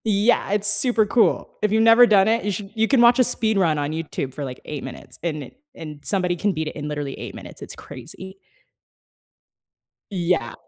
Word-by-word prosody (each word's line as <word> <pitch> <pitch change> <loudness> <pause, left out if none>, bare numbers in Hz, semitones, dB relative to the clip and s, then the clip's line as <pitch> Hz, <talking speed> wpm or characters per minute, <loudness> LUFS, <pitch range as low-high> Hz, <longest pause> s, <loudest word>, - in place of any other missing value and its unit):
Yeah, 215 +1 +2
it's 205 0 +1
super 225 +1 +3
cool. 220 +3 +2
If 210 - +1
you've 220 +1 +3
never 230 +2 +7
done 200 -2 +4
it, 230 +1 +1
you 205 - -1
should 195 +1 -6
you 225 0 +1
can 265 -1 +3
watch 240 +1 +6
a - - +7
speed 220 -3 +1
run 165 -5 +2
on 145 0 -2
YouTube 155 -4 -4
for, 145 - -6
like, 130 -2 -6
8 150 -2 -6
minutes, 130 - -10
and 155 -3 -3
it 250 - -14 0.2
and 150 -3 -9
somebody 180 -3 0
can 205 +4 0
beat 160 -1 -3
it - - -6
in 150 -1 -5
literally 145 -2 -4
8 - - -8
minutes, - - -11
it's - - -7
crazy. 190 +2 -10 1.8
Yeah, 170 -10 -1
195 Hz, 210 wpm, -22 LUFS, 155-220 Hz, 1.8 s, never